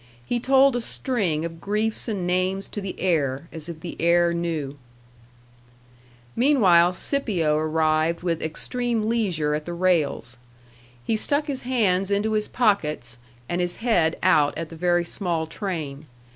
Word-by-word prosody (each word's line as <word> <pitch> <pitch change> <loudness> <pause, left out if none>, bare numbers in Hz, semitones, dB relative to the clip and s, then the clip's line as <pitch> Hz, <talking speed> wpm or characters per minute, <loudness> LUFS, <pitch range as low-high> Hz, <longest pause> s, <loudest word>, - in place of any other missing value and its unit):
He 240 - -1
told 270 +1 +4
a 245 - -1
string 200 - -1
of 165 0 -7
griefs 215 +4 0
and 200 -6 -2
names 185 +2 0
to 205 - -5
the 195 -1 -6
air, 150 -5 0
as 160 0 -7
if 160 -2 -8
the 170 - -6
air 170 0 +3
knew. 160 -5 -3 1.6
Meanwhile 190 -10 +4
Scipio 180 - +1
arrived 155 +1 +1
with 170 -2 -1
extreme 230 +7 -1
leisure 185 -10 0
at 150 0 -3
the 175 - -5
rails. 160 -9 0 0.7
He 220 - +1
stuck 285 +7 0
his 275 -3 -4
hands 200 -7 +1
into 205 +2 0
his 215 -1 0
pockets 150 - 0 0.3
and 175 +1 -1
his 175 0 -1
head 175 -9 +1
out 145 0 +3
at 165 0 -5
the 165 - -10
very 175 +1 +1
small 170 -3 -2
train. 155 -6 -5
175 Hz, 150 wpm, -24 LUFS, 160-215 Hz, 1.6 s, told